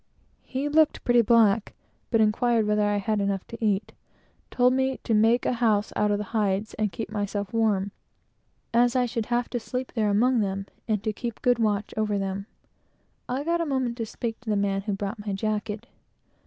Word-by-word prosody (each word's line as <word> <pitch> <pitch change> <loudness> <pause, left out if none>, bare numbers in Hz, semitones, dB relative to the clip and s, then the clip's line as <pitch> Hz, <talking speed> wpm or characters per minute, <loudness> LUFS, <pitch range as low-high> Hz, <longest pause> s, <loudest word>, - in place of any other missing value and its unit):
He 265 +2 -3
looked 310 +1 +3
pretty 240 -1 +5
black, 225 -2 +3 0.3
but 225 -2 +3
inquired 225 +1 +2
whether 210 0 +2
I 205 0 +1
had 205 +1 0
enough 200 -1 -1
to 230 0 -8
eat; 210 0 0 0.6
told 250 0 +3
me 265 0 +1
to 230 - 0
make 225 +3 +4
a - - +2
house 210 -3 +2
out 210 - +2
of 205 - +2
the 210 - -3
hides, 205 -1 0
and 215 -2 -1
keep 220 +3 -6
myself 205 -1 -3
warm, 205 -3 +1 0.8
as 240 +1 +4
I 250 -1 +3
should 230 -2 -3
have 240 0 0
to 245 - -1
sleep 250 +3 -4
there 215 -3 +1
among 240 +5 +3
them, 195 -1 -1 0.2
and 215 -2 0
to 215 -1 -1
keep 235 +1 -6
good 245 -1 +3
watch 210 -2 0
over 215 -1 0
them. 195 +1 -3 0.8
I 260 +3 -1
got 340 +2 0
a - - 0
moment 260 -4 -1
to 225 -2 -3
speak 225 0 -4
to 240 - -8
the 210 - +2
man 200 -1 0
who 205 +1 -3
brought 200 +2 -4
my 205 -1 -3
jacket. 215 +1 -2
220 Hz, 200 wpm, -26 LUFS, 205-240 Hz, 0.8 s, pretty